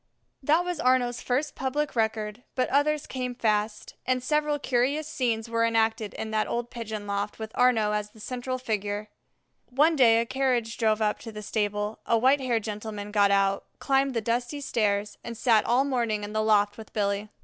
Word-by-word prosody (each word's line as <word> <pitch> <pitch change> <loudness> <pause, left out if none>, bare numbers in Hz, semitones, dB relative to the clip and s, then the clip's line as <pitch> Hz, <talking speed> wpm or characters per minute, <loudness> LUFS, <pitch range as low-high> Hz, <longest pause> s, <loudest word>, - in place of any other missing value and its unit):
III - - -48
That 325 +4 +4
was 355 -3 -3
Arnaux's 250 -1 +2
first 275 +4 -1
public 285 +2 -2
record; 220 0 -1
but 255 - +1
others 295 +1 +2
came 250 -1 -4
fast, 210 -1 -1
and 255 -1 0
several 300 +1 +1
curious 275 +3 0
scenes 235 -6 -1
were 230 0 0
enacted 225 -2 +1
in 220 - -5
that 215 0 +1
old 240 0 -3
pigeon 220 -4 -5
loft 200 +1 -3
with 220 -1 -7
Arnaux 235 -4 +3
as 210 0 -2
the 220 - -19
central 255 +3 -4
figure. 210 -3 -3 0.6
One 300 +6 +3
day 230 -5 +6
a 230 - 0
carriage 245 -3 0
drove 220 -1 +2
up 210 0 0
to 225 - -8
the 210 0 -8
stable; 210 0 -2
a 230 - +4
white 265 +4 +4
haired 240 -4 0
gentleman 210 -1 -5
got 205 -1 +4
out, 195 0 +2
climbed 270 -1 +1
the 230 - +1
dusty 240 +5 -1
stairs, 210 -6 -1
and 235 -1 -6
sat 225 -3 +3
all 250 +3 +3
morning 235 -6 0
in 205 +1 -6
the 215 - +1
loft 210 -1 +2
with 220 - -11
Billy. 200 0 -1
230 Hz, 195 wpm, -27 LUFS, 210-255 Hz, 0.6 s, day